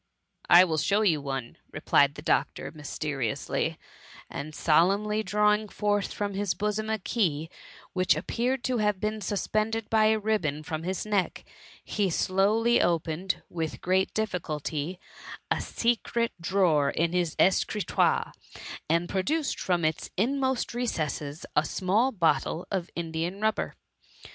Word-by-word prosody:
" - - -51
I 175 +1 +9
will 160 -4 0
show 205 +7 +2
you 160 -8 +3
one," 135 -4 -5
replied 140 0 +3
the 150 - -9
doctor, - - 0
mysteriously; 145 -5 -2 0.5
and 150 +2 -6
solemnly 200 +7 +3
drawing 210 0 +2
forth 205 -1 0
from 205 -1 -3
his 195 -3 -1
bosom 210 +3 -2
a 220 - +1
key^ 165 -7 -1 0.4
which 185 -1 +3
appeared 245 +1 -1
to 250 -2 0
have 210 -1 +2
b^n 215 +2 -2
suspended 215 +3 -1
by 220 -1 +4
a 220 0 +4
ribbon 205 -9 -1
from 155 +1 -4
his 185 +3 -3
neck, 205 -3 -1 0.4
he 205 -3 0
slowly 210 +7 +2
opened, 170 +2 -1
with 160 -2 -4
great 190 +1 +1
difficulty, 170 -5 -3 0.5
a - - +1
secret 235 0 0
drawer 165 -6 +3
in 165 +4 0
his 175 -3 0
escritoire, 195 +2 +2 0.6
and 170 +2 +2
produced 285 - -1
from 175 -3 0
its 155 0 -1
inmost 260 +4 0
recesses 155 -10 -3
a 150 - +4
small 200 - +1
bottle 170 -3 +1
of 185 -3 -2
Indian 170 +3 -3
rubber. 215 0 0
190 Hz, 135 wpm, -27 LUFS, 160-215 Hz, 0.6 s, I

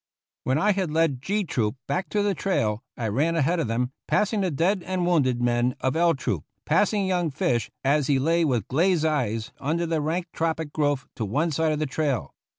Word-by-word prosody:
When 130 +2 +2
I 205 +6 +3
had 190 -4 -1
led 155 -5 +1
G 205 +8 0
Troop 115 - -1
back 145 +7 -2
to 205 -1 +1
the 205 -1 +1
trail 115 - 0 0.2
I 115 - -2
ran 145 +11 +1
ahead 165 +3 +2
of 155 - 0
them, 125 +3 -1 0.2
passing 210 0 +1
the 190 - +1
dead 175 +6 +1
and 185 0 -2
wounded 130 -9 +2
men 120 +1 +1
of 130 +2 0
L 170 0 +3
Troop, 95 - -2 0.2
passing 200 +5 +2
young 180 -3 +1
Fish 125 -5 0
as 140 0 +2
he 140 - +3
lay 165 +5 +2
with 125 - 0
glazed 165 +3 +2
eyes 115 -8 -1
under 165 +5 -1
the 165 -2 0
rank 165 +4 -1
tropic 160 -2 -2
growth 145 -3 0
to 115 - -2
one 145 - 0
side 160 +2 +1
of 155 - 0
the 155 - 0
trail. 135 - -2
155 Hz, 210 wpm, -25 LUFS, 130-170 Hz, 0.2 s, I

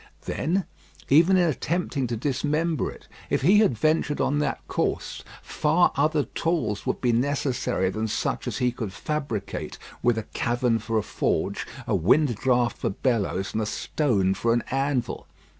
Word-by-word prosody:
Then, 185 +4 -1 0.4
even 165 +7 +6
in 175 -1 +4
attempting 155 -2 -1
to 120 -1 -3
dismember 150 +5 0
it, - - -13 0.2
if - - 0
he 195 +7 +6
had 200 - +3
ventured 155 +2 +1
on 145 +2 +1
that 150 - -2
course, - - -2 0.2
far 160 +4 +2
other 150 +1 +2
tools 130 - -2
would - - -1
be 125 - +2
necessary 125 -6 0
than 110 +3 -2
such - - -2
as - - -2
he 125 -1 +1
could 115 -5 -5
fabricate 140 -10 -4 0.2
with 120 -2 +2
a 110 - -2
cavern 120 +1 0
for 110 +1 -2
a 110 - +1
forge, - - -1 0.2
a - - -1
wind 125 - +3
draught 125 0 +1
for - - 0
bellows, 95 -3 -1
and 110 - 0
a 105 - -1
stone 105 -9 +1
for 115 +4 +1
an 120 - +1
anvil. 135 -3 -1
130 Hz, 165 wpm, -25 LUFS, 115-150 Hz, 0.4 s, even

